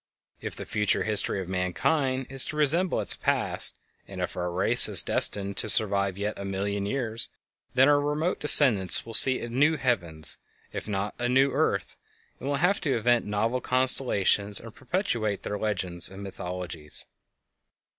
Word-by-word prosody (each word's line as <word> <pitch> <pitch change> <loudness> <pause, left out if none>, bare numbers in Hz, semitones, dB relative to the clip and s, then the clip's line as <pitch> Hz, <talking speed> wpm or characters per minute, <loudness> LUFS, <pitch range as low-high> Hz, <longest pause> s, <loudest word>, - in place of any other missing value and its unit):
If - - -7
the - - -9
future 105 -2 -1
history 105 -2 -1
of 90 - -9
mankind 130 - -2
is 135 -1 +1
to - - -7
resemble 165 +5 +1
its - - +2
past - - +2 0.3
and - - -10
if - - -5
our 90 0 -4
race 90 +2 +4
is - - +8
destined 100 -1 +3
to 110 - 0
survive 100 -3 0
yet 105 +1 -5
a - - -6
million 100 +1 -4
years, 115 -2 -3 0.5
then 130 +2 +4
our 145 0 +3
remote 150 +5 -3
descendents 120 -11 +6
will 115 - -10
see 130 +3 +3
a - - -6
"new 145 +7 0
heavens" 85 - -2 0.3
if - - -7
not 100 0 -4
a 120 0 -2
"new 135 +2 +2
earth," - - -2 0.4
and 135 - -6
will 145 - -1
have 180 +7 0
to 140 -6 -1
invent 120 0 0
novel 115 +5 -2
constellations 115 -6 +1
to 115 - -10
perpetuate 120 - -4
their 105 - -5
legends 90 -5 -2
and 95 +1 -11
mythologies. 90 -5 -7
110 Hz, 165 wpm, -25 LUFS, 100-135 Hz, 0.5 s, is